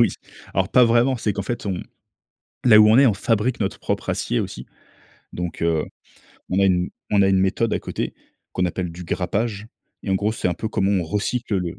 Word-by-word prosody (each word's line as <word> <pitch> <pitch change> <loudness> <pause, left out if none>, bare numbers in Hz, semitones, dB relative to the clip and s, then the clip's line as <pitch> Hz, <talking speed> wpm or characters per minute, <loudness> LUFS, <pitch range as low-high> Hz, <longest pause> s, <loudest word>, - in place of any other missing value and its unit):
oui. 115 - +6 0.5
Alors, 95 0 +1
pas 125 +2 +5
vraiment. 120 +3 +3
C'est 105 -2 -1
qu'en 100 - -3
fait, 120 -3 -4
on 95 -3 -2 0.8
là, 110 -3 +8
où 105 0 +7
on 110 - +6
est, 140 - +7
on 110 - +4
fabrique 115 +4 0
notre 100 -2 -2
propre - - -3
acier - - -1
aussi. - - -5 0.7
Donc, 90 -2 -5
heu, 80 -2 +1 0.7
on 95 - +1
a - - +4
une 90 -2 +2 0.2
on 100 -1 +4
a 95 - +4
une 95 -1 +3
méthode 105 +4 +1
à - - +1
côté, - - -4 0.4
qu'on 90 - 0
appelle 90 0 -2
du 90 +1 -9
grappage 100 +5 -2 0.4
et - - -4
en - - +3
gros, 105 +3 0
c'est 110 - -1
un 90 - -1
peu 110 - -4
comment 100 -2 0
on 95 -3 +2
recycle 105 +4 -2
le 90 -2 -3
100 Hz, 220 wpm, -22 LUFS, 90-110 Hz, 0.8 s, là